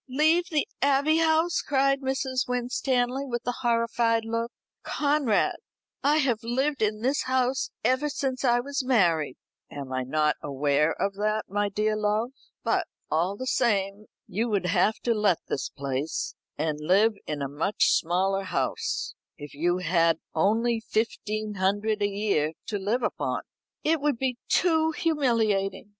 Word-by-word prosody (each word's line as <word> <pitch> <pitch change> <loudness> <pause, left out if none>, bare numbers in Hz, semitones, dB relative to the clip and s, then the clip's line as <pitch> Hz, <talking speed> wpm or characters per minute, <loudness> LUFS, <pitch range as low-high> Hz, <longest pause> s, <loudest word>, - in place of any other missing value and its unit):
"Leave 315 +6 +3
the 305 -4 0
Abbey 285 +3 +3
House!" 325 +1 +2
cried 275 0 +2
Mrs. 265 -1 -1
Winstanley 250 +1 0
with 240 -3 -4
a 245 0 -2
horrified 230 -1 +1
look. 230 +1 -2 0.3
"Conrad, 285 -7 +1 0.4
I 295 +2 +3
have 250 -7 +1
lived 260 +4 -1
in 215 0 0
this 270 +3 +1
house 255 0 +1
ever 260 +4 +2
since 265 -2 -2
I 240 -1 +3
was 280 +2 -3
married." 170 - +2 0.3
"Am 140 -2 -7
I 130 - 0
not 150 +4 +1
aware 145 +2 +1
of 200 - 0
that, 215 +1 0
my 205 +1 0
dear 215 +2 0
love? 215 +3 0 0.3
But, - - +1 0.2
all 175 +6 +1
the 255 - -5
same, 205 -5 0 0.2
you 225 +6 -2
would 200 -4 0
have 185 +4 +2
to 235 - +2
let 210 -5 +2
this 135 - -2
place, 140 +2 -3 0.2
and 155 0 -1
live 195 +8 +4
in 145 -2 -3
a - - -1
much 150 +9 +1
smaller 190 +3 +1
house, 455 - -2 0.2
if 145 -3 -9
you 175 +5 +1
had 170 -2 +2 0.2
only 225 +7 +2
fifteen 215 -1 -2
hundred 205 +3 0
a 205 - +2
year 195 -7 0 0.2
to 205 -2 -2
live 220 +6 -1
upon." - - -1 0.4
"It 315 -1 +2
would 290 -4 +1
be 255 -1 -2
too 320 -2 +3
humiliating! 230 -12 0
225 Hz, 150 wpm, -26 LUFS, 190-260 Hz, 0.4 s, live